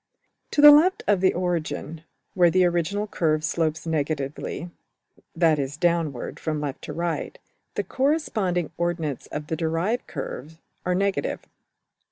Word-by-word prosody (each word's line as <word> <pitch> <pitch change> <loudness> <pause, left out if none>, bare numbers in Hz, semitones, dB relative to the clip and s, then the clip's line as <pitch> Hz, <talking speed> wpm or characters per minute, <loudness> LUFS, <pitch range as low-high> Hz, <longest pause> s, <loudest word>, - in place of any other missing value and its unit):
To 290 - +1
the 295 0 +12
left 325 +6 +5
of 200 -3 +3
the 190 - +5
origin, 170 -2 -2 0.3
where 180 -3 +5
the 185 +1 +4
original 175 +4 0
curve 155 -6 0
slopes 160 0 -1
negatively 155 +1 -3 0.6
(that 165 -3 +3
is, 140 +1 -3
downward 165 -6 -1
from 155 -2 -2
left 145 -2 -4
to 150 - -6
right) 170 +1 -3 0.4
the - - 0
corresponding 220 - 0
ordinates 165 -5 -2
of 150 - -5
the 160 - -2
derived 165 +8 -1
curve 155 +1 -6 0.3
are 180 - +2
negative. 195 +1 -1
170 Hz, 140 wpm, -25 LUFS, 155-185 Hz, 0.6 s, the